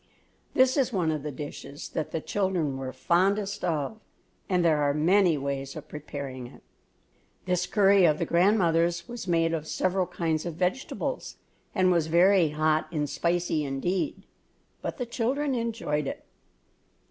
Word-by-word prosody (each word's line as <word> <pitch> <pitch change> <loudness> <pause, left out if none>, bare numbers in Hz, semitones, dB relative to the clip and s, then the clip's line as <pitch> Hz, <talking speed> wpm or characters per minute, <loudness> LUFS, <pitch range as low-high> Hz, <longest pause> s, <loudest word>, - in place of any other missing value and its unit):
This 260 +2 +4
is 265 -2 +2
one 175 -7 +1
of 155 -2 -2
the 150 +1 -4
dishes 145 +1 -8
that 155 - -3
the 160 - -3
children 180 -9 -1
were 135 -1 -4
fondest 190 +10 +1
of 170 +5 -1 0.5
and 180 -2 +2
there 155 -3 +3
are 145 0 +2
many 175 +1 +4
ways 140 0 -4
of - - -8
preparing 140 -4 -7
it. - - -16 0.8
This 180 -1 0
curry 200 -2 +5
of 155 -2 +4
the - - -1
grandmother's 170 -2 +2
was 240 -4 -7
made 165 -1 +2
of 155 -1 -3
several 185 +1 0
kinds 160 -3 -1
of 170 -3 -5
vegetables, 185 - -2 0.4
and 185 -1 +4
was 170 -3 +2
very 175 +1 +5
hot 155 +1 +1
and 150 -3 -1
spicy 170 0 0
indeed, 175 - -2 0.6
but - - -4
the 250 - -2
children 265 +5 -1
enjoyed 225 - -1
it. - - -6
170 Hz, 155 wpm, -27 LUFS, 150-195 Hz, 0.8 s, curry